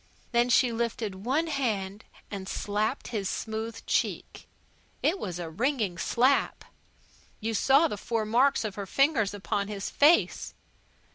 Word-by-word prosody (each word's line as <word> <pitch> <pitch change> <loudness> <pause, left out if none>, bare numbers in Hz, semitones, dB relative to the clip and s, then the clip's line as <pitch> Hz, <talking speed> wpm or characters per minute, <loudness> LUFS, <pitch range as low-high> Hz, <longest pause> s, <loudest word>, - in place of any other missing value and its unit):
Then 240 0 +3
she 245 0 +4
lifted 225 -4 -3
one 285 +7 +1
hand 220 -9 -2 0.3
and 195 -2 -5
slapped 210 +6 -2
his 205 -5 -2
smooth 220 +1 -4
cheek. - - -2 0.6
It 360 +5 +2
was 180 -4 -4
a 175 -2 -5
ringing 215 - -1
slap. 255 +8 +1 0.7
You 225 +1 -2
saw 275 +8 +4
the 210 - -5
four 225 +1 -2
marks 240 +3 +3
of 210 - -3
her 200 0 -6
fingers 250 - +2
upon 200 0 -2
his 205 -1 -5
face. 305 +4 +3
225 Hz, 140 wpm, -28 LUFS, 200-260 Hz, 0.7 s, she